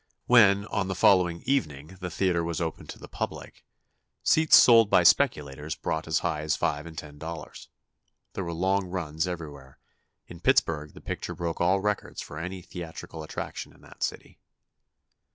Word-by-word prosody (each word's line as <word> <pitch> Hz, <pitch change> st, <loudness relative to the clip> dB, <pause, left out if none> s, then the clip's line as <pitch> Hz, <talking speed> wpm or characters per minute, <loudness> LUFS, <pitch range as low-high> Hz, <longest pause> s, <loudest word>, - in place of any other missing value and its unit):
When, 105 Hz, -4 st, +5 dB
on 100 Hz, -2 st, -2 dB
the 95 Hz, -, -3 dB
following 90 Hz, -2 st, +3 dB
evening, 90 Hz, -, -2 dB
the 90 Hz, -1 st, -4 dB
theatre 90 Hz, -1 st, 0 dB
was 85 Hz, -1 st, -3 dB
opened 80 Hz, -2 st, -4 dB
to -, -, -7 dB
the -, -, -11 dB
public, -, -, -6 dB, 0.6 s
seats 160 Hz, 0 st, +5 dB
sold 115 Hz, -3 st, +7 dB
by -, -, +5 dB
speculators 75 Hz, +1 st, +2 dB
brought 80 Hz, 0 st, -3 dB
as 80 Hz, -, +1 dB
high 80 Hz, -3 st, -1 dB
as 75 Hz, 0 st, 0 dB
five 75 Hz, +2 st, -2 dB
and 80 Hz, -1 st, -11 dB
ten 75 Hz, -1 st, -9 dB
dollars. 80 Hz, +2 st, -8 dB, 0.6 s
There 95 Hz, -, -3 dB
were 85 Hz, -, -4 dB
long 95 Hz, +3 st, 0 dB
runs 80 Hz, -2 st, -3 dB
everywhere. 75 Hz, -6 st, -8 dB, 0.5 s
In -, -, -12 dB
Pittsburgh, 75 Hz, -2 st, +1 dB
the -, -, -12 dB
picture -, -, -5 dB
broke 85 Hz, -1 st, -3 dB
all 95 Hz, +3 st, +3 dB
records 105 Hz, 0 st, -2 dB
for 75 Hz, -, -7 dB
any 90 Hz, +2 st, -6 dB
theatrical 85 Hz, -2 st, -8 dB
attraction 75 Hz, -, -6 dB
in -, -, -22 dB
that -, -, -17 dB
city. -, -, -4 dB
85 Hz, 170 wpm, -27 LUFS, 80-95 Hz, 0.6 s, sold